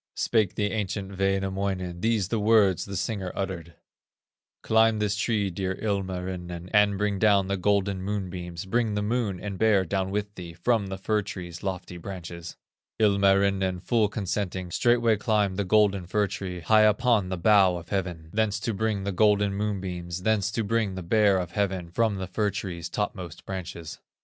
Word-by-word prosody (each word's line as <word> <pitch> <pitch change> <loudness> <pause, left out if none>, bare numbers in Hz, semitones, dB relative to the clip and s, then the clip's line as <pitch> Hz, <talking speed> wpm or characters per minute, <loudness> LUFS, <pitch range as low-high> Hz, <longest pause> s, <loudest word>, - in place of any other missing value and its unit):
Spake 110 -5 +1
the 105 -1 0
ancient 100 -2 -3
Wainamoinen:, 95 -2 -1
These 110 -3 +1
the 115 - 0
words 105 -4 +3
the 100 - -6
singer 95 0 -3
uttered: 85 -4 -4 0.9
"Climb 110 0 +4
this 105 -1 0
tree, 105 -2 0
dear 95 +1 -2
Ilmarinen, 90 -3 -4
And 105 -1 +4
bring 105 -1 -1
down 100 -2 +4
the 100 - 0
golden 100 0 +1
moonbeams, 90 -3 -4
Bring 110 +1 0
the 105 - -1
Moon 105 -4 -1
and 100 -2 -6
Bear 105 -4 +4
down 95 +1 -1
with 105 +1 -3
thee 85 -4 -8
From 110 +3 0
the 95 0 -5
fir 105 +2 0
tree's 90 -4 -7
lofty 90 -2 -4
branches." 85 -2 -8 0.4
Ilmarinen, 100 -2 +3
full 110 +3 +2
consenting, 95 -3 -3
Straightway 120 +1 +3
climbed 105 -3 +1
the 100 - 0
golden 100 -2 +3
fir 105 +2 +1
tree, 95 -2 -5
High 110 +5 +4
upon 110 -2 +3
the 95 - -2
bow 95 0 +5
of 85 0 -10
heaven, 90 -5 -3
Thence 110 0 +1
to 115 - -1
bring 105 -1 -1
the 100 - -2
golden 105 0 +3
moonbeams, 90 -4 -3
Thence 105 -2 +2
to 115 - 0
bring 105 -2 0
the 95 - -5
Bear 100 +1 +3
of 90 -2 -3
heaven, 95 -3 -2
From 110 +2 +1
the 95 -1 -4
fir 105 +3 0
tree's 90 -4 -5
topmost 90 -4 -4
branches. 85 -4 -6
100 Hz, 170 wpm, -26 LUFS, 90-105 Hz, 0.9 s, bow